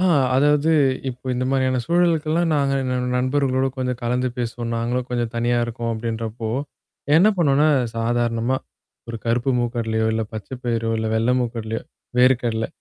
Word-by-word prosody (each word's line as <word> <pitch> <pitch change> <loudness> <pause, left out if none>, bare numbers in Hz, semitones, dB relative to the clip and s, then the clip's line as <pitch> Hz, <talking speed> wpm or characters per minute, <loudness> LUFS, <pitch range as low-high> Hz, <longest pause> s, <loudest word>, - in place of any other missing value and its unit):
ஆ 185 - +2 0.3
அதாவது, 145 +3 +3 0.4
இப்ப 130 +1 -5
இந்த 125 +1 -1
மாதிரியான 130 -1 +1
சூழலுக்கல்லாம் 170 -1 +2
நாங்க 140 -2 +1
எங்க 125 -1 -1 0.2
நண்பர்களோடு 130 0 +1
கொஞ்சம் 125 -1 -2
கலந்து 125 +2 0
பேசுவோம். 120 0 -3
நாங்களும் 120 +2 -1
கொஞ்சம் 120 -2 -2
தனியா 120 +1 +1
இருக்கோம் 115 0 -4
அப்படின்றப்போ. 115 0 -4 0.7
என்ன 185 +6 +6
பண்ணுவோம்ன்னா, 150 -3 +3 0.3
சாதாரணமா, 120 +1 0 0.5
ஒரு 115 - -4
கருப்பு 120 +3 +1
மூக்கு 120 0 -2
கடலையோ, 110 -1 0
இல்ல 110 0 0
பச்சை 110 +4 -6
பயிரோ, 115 -1 0
இல்ல 110 - -1
வெள்ளை 115 +3 +2
மூக்கு 120 -2 -2
கடலையோ, 110 0 -4 0.4
வேர்க்கடல. 120 -3 +3
120 Hz, 150 wpm, -22 LUFS, 115-130 Hz, 0.7 s, என்ன